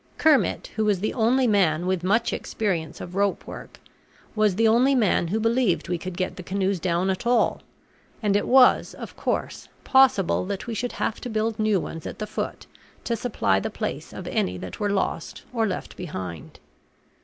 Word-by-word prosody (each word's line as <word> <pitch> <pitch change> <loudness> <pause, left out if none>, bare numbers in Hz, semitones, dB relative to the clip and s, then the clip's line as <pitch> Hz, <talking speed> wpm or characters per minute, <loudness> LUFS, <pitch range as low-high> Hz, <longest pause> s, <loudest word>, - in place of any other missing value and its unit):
Kermit, 310 -4 +2
who 220 - +1
was 205 -3 +2
the 215 - -1
only 250 +2 +3
man 180 -7 +2
with 185 -1 0
much 205 +6 +2
experience 180 -7 -2
of 175 - -8
rope 200 +1 0
work, - - -10 0.5
was 215 -3 +2
the 225 +3 +3
only 250 +5 +4
man 210 -7 +2
who 210 +6 -1
believed 230 -3 +1
we 175 -1 -1
could 180 +1 -6
get 185 - -2
the - - -6
canoes 190 +1 -1
down 180 +2 +1
at 190 +5 -4
all; 240 -2 +2 0.6
and 205 -2 +2
it 205 - +1
was, 255 0 +5
of - - -9
course, - - -3 0.2
possible 265 -9 +4
that 200 -1 -4
we 235 - -4
should 245 +3 -3
have - - -2
to 245 - -5
build 220 0 -1
new 215 -3 +2
ones 165 -1 -6
at - - -7
the 215 - -3
foot - - -5 0.4
to 235 - -1
supply 210 - +1
the - - -3
place - - -5
of - - -8
any 90 0 -1
that 90 0 -8
were 205 - 0
lost 200 -1 -2
or 225 -2 +1
left 190 - -5
behind. 95 - -7
205 Hz, 190 wpm, -25 LUFS, 180-230 Hz, 0.6 s, was